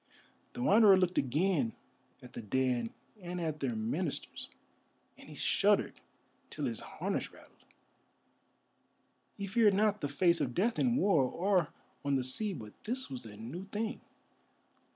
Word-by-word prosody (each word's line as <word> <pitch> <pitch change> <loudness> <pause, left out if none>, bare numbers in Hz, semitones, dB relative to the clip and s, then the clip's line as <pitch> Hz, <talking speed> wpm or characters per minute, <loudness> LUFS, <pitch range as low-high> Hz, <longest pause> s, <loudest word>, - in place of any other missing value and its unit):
The 120 - -4
Wanderer 205 - +7
looked 185 -1 +2
again 140 -2 +1 0.5
at 125 - -12
the - - -6
dead 120 +1 0 0.3
and 180 0 -5
at 160 -3 -3
their 240 - -1
ministers, 225 +3 -3 0.7
and - - -15
he - - -10
shuddered - - +2 0.5
till - - -4
his - - -2
harness - - -3
rattled. - - -19 1.7
He 200 - -4
feared 205 0 +4
not 210 0 +2
the 145 - -2
face 170 +3 +2
of 125 -4 -2
Death 225 +6 +1
in 245 -2 +2
war, 195 - +4
or 180 +4 +1 0.4
on 140 -1 +1
the 130 - +1
sea, 200 - 0
but 110 - -8
this 255 - -3
was 125 -3 -6
a 105 -1 -11
new 130 - -7
thing. 215 +4 -4
175 Hz, 150 wpm, -32 LUFS, 130-205 Hz, 1.7 s, Wanderer